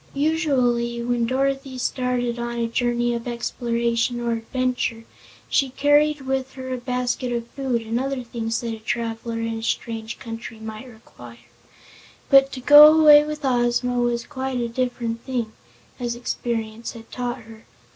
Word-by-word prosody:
Usually 260 -6 +1
when 240 -1 0
Dorothy 270 +1 -1
started 250 -1 -1
on 235 0 -3
a 235 - 0
journey 240 +1 0
of 235 +1 -4
exploration 235 0 -1
or 235 0 -1
adventure, 230 0 -2 0.4
she 275 - +2
carried 290 +2 +3
with 265 0 -2
her 260 -1 -6
a 255 - -3
basket 250 0 -2
of 235 -1 -3
food, 255 -4 -2
and 225 +2 -2
other 270 -1 -2
things 230 -1 -3
that 230 -1 -3
a 220 - -7
traveler 230 +1 -3
in 225 0 -3
a - - -9
strange 225 -1 -3
country 225 -2 -8
might 220 +2 -8
require, 120 - -15 0.8
but 275 0 +7
to 255 - -6
go 295 +3 +10
away 295 -1 +8
with 300 -1 -5
Ozma 245 -1 +1
was 240 -1 0
quite 265 -3 -3
a 235 - -1
different 235 -1 -2
thing, 245 -4 -3 0.5
as 240 -1 -2
experience 230 -2 -4
had 230 -1 -13
taught 245 -1 -4
her. 225 0 -14
240 Hz, 155 wpm, -23 LUFS, 230-260 Hz, 0.8 s, go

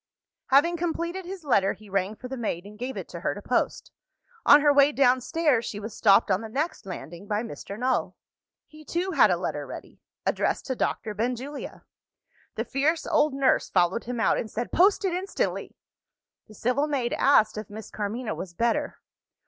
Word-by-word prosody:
F." 265 - +2
Having 340 +5 +4
completed 345 +2 -3
his 370 -1 -7
letter, 200 -9 +2
he 215 - -16
rang 195 +1 -1
for 250 - -9
the 265 - -5
maid, 210 -7 -3
and 210 +1 -12
gave 255 +2 -4
it - - -5
to - - -7
her - - -1
to - - -8
post. - - -1 0.6
On 290 - +9
her 290 0 +5
way 280 +1 +6
downstairs, 270 0 +2
she 210 - -5
was 215 +1 -7
stopped 205 0 +4
on 185 +2 +2
the 225 - -7
next 280 - -3
landing 175 +2 -8
by 210 +2 -1
Mr. 210 -3 -8
Null. 255 +2 0 0.5
He 310 0 -15
too 350 +5 -2
had - - +5
a - - +2
letter - - -4
ready: - - -10 0.2
addressed - - 0
to 260 - -2
Doctor 220 -2 -2
Benjulia. 250 +6 -4 0.7
The - - -2
fierce 310 +4 0
old 295 -2 +2
nurse 275 -1 +2
followed 180 +6 +1
him 245 0 -4
out, 225 - +2
and 220 - -4
said, 235 +3 -4
"Post 390 +3 +4
it 370 - 0
instantly!" 375 +3 -3 0.7
The 215 - -15
civil 250 +8 0
maid 265 -5 -1
asked 220 -6 +4
if 215 -1 -6
Miss 215 +1 -9
Carmina 215 +3 -3
was 175 -2 -7
better. 230 +2 0
250 Hz, 190 wpm, -26 LUFS, 215-295 Hz, 0.7 s, On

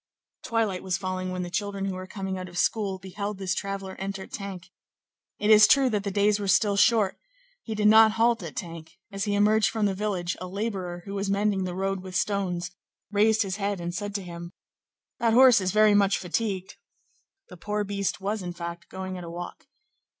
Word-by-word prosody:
Twilight 220 -5 -1
was 190 -1 -1
falling 185 -1 -3
when 185 0 -3
the 175 - -6
children 200 +1 -2
who 195 - -2
were 185 0 -7
coming 190 -2 -4
out 185 -1 -6
of 175 - -10
school 200 -1 0
beheld 200 +2 -5
this 190 -1 -1
traveller 195 -1 -4
enter 195 0 -4
Tinques; 190 -2 -8 0.7
it 210 +1 +2
is 215 0 +9
true 270 -2 +4
that 210 -2 -1
the 200 - -2
days 205 +1 +2
were 200 - -3
still 200 +2 +3
short; 205 -2 +3 0.4
he 220 - -5
did 210 0 +2
not 220 0 +7
halt 230 +1 +2
at - - -7
Tinques; 165 -3 -7 0.2
as 195 +1 -3
he 205 -1 0
emerged 210 +1 +4
from 220 -2 -1
the 200 - +1
village, 190 -3 -2
a 185 - -4
laborer, 185 -3 -4
who 200 - -6
was 200 0 -2
mending 200 -1 +1
the 180 -1 -4
road 195 +1 -1
with 185 -1 -9
stones, 180 -2 -1 0.4
raised 215 +1 +3
his 195 -1 -4
head 200 -1 -2
and 175 0 -4
said 205 +2 -4
to 200 - -2
him:— 170 0 -8 0.7
"That 230 -1 +2
horse 250 -3 +7
is 185 0 0
very 215 +1 +5
much 200 -1 +3
fatigued." 190 0 -3 0.7
The 180 - -11
poor 210 +3 -2
beast 200 -1 -2
was, 205 +2 -2
in 175 -1 -5
fact, 170 +1 -7
going 185 -1 -6
at - - -8
a 170 - -7
walk. 175 +8 -8
195 Hz, 210 wpm, -26 LUFS, 185-210 Hz, 0.7 s, is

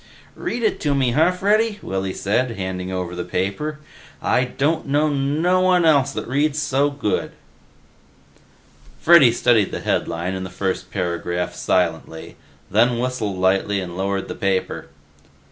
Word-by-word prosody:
"Read 235 0 -4
it 220 - +1
to 145 -2 0
me, 130 -3 +2
huh, 155 +8 +4
Freddy," 210 +4 +1
Willy 95 0 -3
said, 115 +5 -1
handing 95 -1 -4
over 90 -1 -3
the 90 - -3
paper. 100 - -3 0.4
"I 125 - +1
don't 145 +6 -1
know 145 +2 +2
no 150 +6 +1
one 180 -2 +3
else 140 -4 +4
that - - -5
reads 145 +4 0
so 140 -1 +1
good." 140 -7 -2 1.7
Freddy 155 -8 +7
studied 115 -3 +2
the - - -5
headline 85 +3 -1
and 95 0 -4
the 95 - -6
first 95 0 -3
paragraph 90 -1 -2
silently, 80 0 -2 0.4
then 120 0 +3
whistled 120 -6 -2
lightly 95 +2 +1
and 90 -2 -6
lowered 95 +1 -2
the - - -5
paper. 95 -1 -2
120 Hz, 145 wpm, -21 LUFS, 95-150 Hz, 1.7 s, Freddy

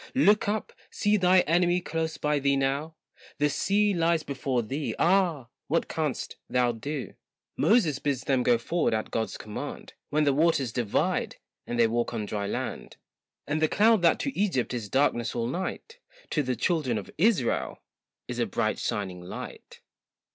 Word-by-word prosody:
Look 210 -6 +4
up, 215 0 -2 0.2
see 205 +1 +1
thy 185 -2 +5
enemy 175 +2 +2
close 160 -2 -3
by 150 -1 +1
thee 140 0 +2
now, 140 +4 -1 0.4
The 150 0 +2
sea 205 +6 +2
lies 165 -2 +2
before 135 -3 -1
thee, 140 +7 -3
ah! 170 -8 +2 0.2
what 165 +3 +1
canst 155 -5 -3
thou 125 -1 +2
do? 135 +4 -5 0.4
Moses 175 - +3
bids 140 -3 -1
them 130 -2 +1
go 120 -1 +4
forward 155 +1 0
at 110 - -3
God's 110 -1 -2
command, 105 0 -7 0.2
When 150 +1 +2
the 140 -2 +3
waters 140 -5 +2
divide, 120 -5 0 0.3
and 120 - -3
they 115 - +6
walk 120 +1 -1
on 110 -2 -2
dry 100 -1 -3
land; - - -5 0.5
And 155 +2 -1
the 155 - +4
cloud 220 -1 +4
that 170 -2 +4
to 275 - -3
Egypt 180 - 0
is 115 -4 -4
darkness 125 -3 +1
all 115 -1 -1
night, 190 - -4 0.3
To 150 - +2
the 130 -2 -1
children 150 -9 0
of 105 - -7
Israel, 175 - +1 0.4
is - - -5
a - - +1
bright - - -1
shining 95 -3 -3
light. 90 - -9
145 Hz, 170 wpm, -27 LUFS, 120-175 Hz, 0.5 s, they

